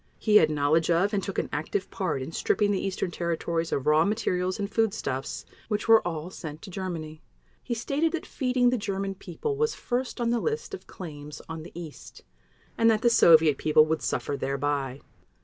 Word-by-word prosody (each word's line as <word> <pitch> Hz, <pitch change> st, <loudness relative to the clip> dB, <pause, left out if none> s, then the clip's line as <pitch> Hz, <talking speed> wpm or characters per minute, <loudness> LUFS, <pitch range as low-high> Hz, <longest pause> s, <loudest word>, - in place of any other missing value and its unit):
He 210 Hz, -2 st, +5 dB
had 160 Hz, -6 st, +5 dB
knowledge 155 Hz, +2 st, +2 dB
of 180 Hz, +5 st, +2 dB
and 200 Hz, -, +1 dB
took 195 Hz, 0 st, -5 dB
an -, -, 0 dB
active 170 Hz, +6 st, -2 dB
part 165 Hz, -8 st, -2 dB
in 135 Hz, -, -7 dB
stripping 205 Hz, +5 st, +1 dB
the 195 Hz, -, -1 dB
Eastern 190 Hz, -2 st, -2 dB
Territories 170 Hz, -1 st, -2 dB
of 135 Hz, -, -1 dB
raw 150 Hz, +1 st, +5 dB
materials 185 Hz, -3 st, 0 dB
and 200 Hz, -1 st, -2 dB
foodstuffs, 200 Hz, -, -2 dB, 0.2 s
which 210 Hz, 0 st, -2 dB
were 225 Hz, -1 st, +7 dB
all 170 Hz, 0 st, -4 dB
sent 155 Hz, -4 st, -8 dB
to 195 Hz, -, -9 dB
Germany. 165 Hz, -5 st, -5 dB, 0.4 s
He 240 Hz, -, -3 dB
stated 280 Hz, +8 st, 0 dB
that 335 Hz, -, -3 dB
feeding 250 Hz, -2 st, +1 dB
the 250 Hz, -, 0 dB
German 195 Hz, -1 st, -2 dB
People 195 Hz, -, -4 dB
was 455 Hz, +1 st, +1 dB
first 250 Hz, +1 st, -3 dB
on 235 Hz, -1 st, +1 dB
the 240 Hz, -, +1 dB
list 450 Hz, -, -3 dB
of 395 Hz, -, -8 dB
claims 150 Hz, -4 st, -9 dB
on 160 Hz, 0 st, -6 dB
the 165 Hz, -, -10 dB
East, 160 Hz, -4 st, -10 dB, 0.6 s
and 230 Hz, 0 st, +5 dB
that 220 Hz, -1 st, +2 dB
the 235 Hz, -, +5 dB
Soviet 160 Hz, -8 st, +6 dB
People 155 Hz, 0 st, +5 dB
would 155 Hz, 0 st, -1 dB
suffer 145 Hz, -, -2 dB
thereby. 140 Hz, -1 st, -2 dB
180 Hz, 195 wpm, -27 LUFS, 155-220 Hz, 0.6 s, were